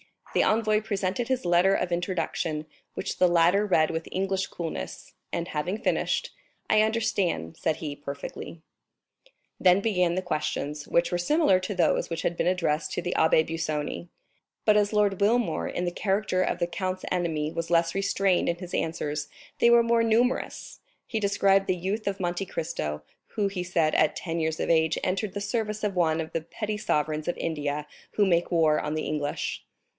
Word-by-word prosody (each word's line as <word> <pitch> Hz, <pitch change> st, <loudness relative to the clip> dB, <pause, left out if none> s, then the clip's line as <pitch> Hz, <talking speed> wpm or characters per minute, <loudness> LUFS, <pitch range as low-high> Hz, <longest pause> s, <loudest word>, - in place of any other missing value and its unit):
The -, -, +3 dB
envoy 215 Hz, -1 st, +2 dB
presented 205 Hz, +1 st, -2 dB
his 260 Hz, -1 st, 0 dB
letter 175 Hz, +2 st, +4 dB
of 180 Hz, -, -1 dB
introduction, 170 Hz, -3 st, -2 dB, 0.3 s
which -, -, -4 dB
the 180 Hz, -, +6 dB
latter 175 Hz, +4 st, +4 dB
read 160 Hz, -6 st, +3 dB
with 160 Hz, 0 st, -4 dB
English 190 Hz, 0 st, -1 dB
coolness, 165 Hz, -2 st, -6 dB, 0.2 s
and 170 Hz, +1 st, -3 dB
having 175 Hz, +6 st, -2 dB
finished: -, -, 0 dB, 0.4 s
"I 215 Hz, -, +5 dB
understand," 200 Hz, -, 0 dB
said 160 Hz, -, 0 dB
he, 145 Hz, -3 st, -6 dB
"perfectly." 145 Hz, +3 st, -7 dB, 0.6 s
30293m -, -, -30 dB, 0.2 s
Then 180 Hz, 0 st, +6 dB
began 180 Hz, -5 st, +1 dB
the 185 Hz, -, 0 dB
questions, 150 Hz, -3 st, -3 dB
which 170 Hz, 0 st, +2 dB
were 175 Hz, -, +1 dB
similar 195 Hz, -, +3 dB
to 185 Hz, +2 st, -4 dB
those 170 Hz, -3 st, +2 dB
which 165 Hz, -1 st, -3 dB
had 170 Hz, -, 0 dB
been -, -, +1 dB
addressed 170 Hz, -4 st, 0 dB
to -, -, -1 dB
the 175 Hz, +1 st, -2 dB
Abbé 160 Hz, 0 st, +4 dB
Busoni. 150 Hz, -, -3 dB, 0.6 s
But 210 Hz, -1 st, +5 dB
as 205 Hz, 0 st, +2 dB
Lord 205 Hz, -2 st, +2 dB
Wilmore, 230 Hz, +3 st, +2 dB
in 180 Hz, -, -2 dB
the 175 Hz, -, -1 dB
character 195 Hz, 0 st, 0 dB
of 185 Hz, -, 0 dB
the 175 Hz, -, +1 dB
count's 185 Hz, +2 st, -3 dB
enemy, 160 Hz, -4 st, -1 dB
was 165 Hz, 0 st, -4 dB
less 170 Hz, -1 st, +3 dB
restrained 195 Hz, -2 st, +1 dB
in 170 Hz, -, +1 dB
his 180 Hz, 0 st, -9 dB
answers, 150 Hz, -2 st, -2 dB, 0.3 s
they 235 Hz, -, +5 dB
were 235 Hz, 0 st, +6 dB
more 230 Hz, 0 st, +3 dB
numerous; 230 Hz, +3 st, 0 dB, 0.3 s
he 220 Hz, -, -2 dB
described 195 Hz, -1 st, +3 dB
the 185 Hz, -, +2 dB
youth 195 Hz, +5 st, -3 dB
of 195 Hz, -1 st, -2 dB
Monte 175 Hz, +2 st, -1 dB
Cristo, 75 Hz, -, -4 dB, 0.3 s
who 205 Hz, -2 st, +1 dB
he 185 Hz, -2 st, -3 dB
said, 165 Hz, -3 st, +1 dB
at 155 Hz, -, +3 dB
ten 170 Hz, -1 st, -3 dB
years 160 Hz, -1 st, -1 dB
of -, -, -1 dB
age, 160 Hz, -1 st, +3 dB
entered 195 Hz, +2 st, -1 dB
the 205 Hz, -, -4 dB
service 215 Hz, 0 st, -2 dB
of 205 Hz, -2 st, -1 dB
one 165 Hz, -2 st, +2 dB
of 160 Hz, -, -6 dB
the 165 Hz, -, -2 dB
petty 210 Hz, +6 st, -4 dB
sovereigns 155 Hz, -5 st, -1 dB
of 175 Hz, -, -1 dB
India 150 Hz, -2 st, -2 dB, 0.3 s
who 205 Hz, -, +2 dB
make 175 Hz, -2 st, +2 dB
war 160 Hz, -3 st, +3 dB
on 150 Hz, -, -3 dB
the 155 Hz, -, -2 dB
English. 150 Hz, -1 st, -3 dB
180 Hz, 185 wpm, -27 LUFS, 160-200 Hz, 0.6 s, the